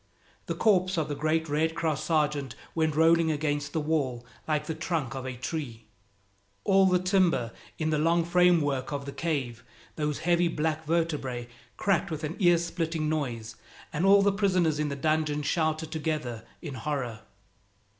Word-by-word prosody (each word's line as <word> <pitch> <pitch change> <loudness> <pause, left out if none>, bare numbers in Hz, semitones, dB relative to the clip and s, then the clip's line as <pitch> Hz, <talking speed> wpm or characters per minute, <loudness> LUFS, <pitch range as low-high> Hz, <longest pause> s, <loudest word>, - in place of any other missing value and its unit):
The - - -2
corpse 185 -4 +2
of 155 -2 0
the 145 - -2
great 160 +2 0
Red 160 +2 0
Cross 155 -4 -1
sergeant 150 -5 0 0.2
went 160 -2 +1
rolling 165 +1 +4
against 145 -1 -1
the 160 - -1
wall 140 -6 -1 0.2
like 150 -1 0
the 160 - -3
trunk 155 -5 -2
of 130 -1 -5
a 130 - -4
tree. 125 -5 -5 0.8
All 195 0 +5
the 180 -1 +4
timber 180 - +2 0.3
in 155 0 -1
the 155 - +1
long 165 +2 +2
frame 180 -1 +4
work 135 -2 -1
of 140 -1 -3
the 140 - -5
cave, 135 -8 -3 0.3
those 150 -2 -1
heavy 175 0 +3
black 160 -1 -1
vertebrae, 150 -7 -1 0.3
cracked 195 -5 +1
with 160 -1 -5
an 155 +3 -3
ear 175 -3 +5
splitting 165 -2 -2
noise, 120 -8 -3 0.4
and 150 - -1
all 200 +1 +6
the 200 - +4
prisoners 185 -6 +2
in 150 -1 0
the 140 - -3
dungeon 150 0 0
shouted 160 +1 0
together 150 -8 -3 0.2
in 150 -5 -5
horror. 125 -3 -3
155 Hz, 170 wpm, -28 LUFS, 145-165 Hz, 0.8 s, all